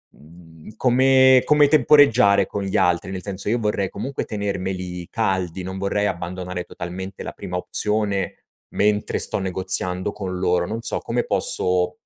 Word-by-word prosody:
mhmm, 80 +2 -16
come 130 +1 +5
come 150 -1 +4
temporeggiare 130 -8 +5
con 100 - -4
gli 95 - -1
altri? 90 +1 +1
Nel 95 -1 -5
senso, 100 0 -4
io 120 +1 +1
vorrei 105 -3 -1
comunque 135 +7 -4
tenermeli 95 -3 -4
caldi, 95 -4 -2
non 95 +1 -6
vorrei 100 +1 -1
abbandonare 90 -1 -4
totalmente 90 +3 -7
la - - -7
prima 90 0 -5
opzione 105 +1 -1 0.4
mentre 105 0 0
sto - - 0
negoziando 95 0 0
con 95 -3 -5
loro, 90 -1 +1
non 115 +5 -5
so, - - -1
come - - -2
posso 90 0 0
95 Hz, 150 wpm, -22 LUFS, 90-105 Hz, 0.4 s, come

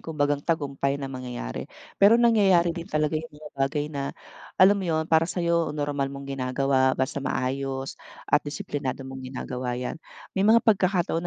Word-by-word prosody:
kumbagang 145 -2 -1
tagumpay 140 -3 -1
na 135 -1 -6
mangyayari. 125 - -6 0.3
Pero 205 +3 +7
nangyayari 195 -8 +4
din 170 +1 -7
talaga 155 -2 0
yung 160 - -9
mga 150 0 -11
bagay 140 +2 -1
na 140 -1 -4 0.4
alam 200 +2 +6
mo 190 - -3
'yon, 160 -1 +1
para 160 +1 +3
sa'yo 170 -4 0
normal 145 -2 -1
mong 140 0 -8
ginagawa, 130 0 +1
basta 130 +2 -1
maayos 135 +1 -3 0.2
at 150 - +3
disiplinado 140 -2 -4
mong 130 0 -8
ginagawa 125 -1 -4
'yan, 125 +5 -5 0.3
may 190 - -1
mga 220 +4 +5
pagkakataon 185 -5 +2
145 Hz, 160 wpm, -26 LUFS, 135-170 Hz, 0.4 s, Pero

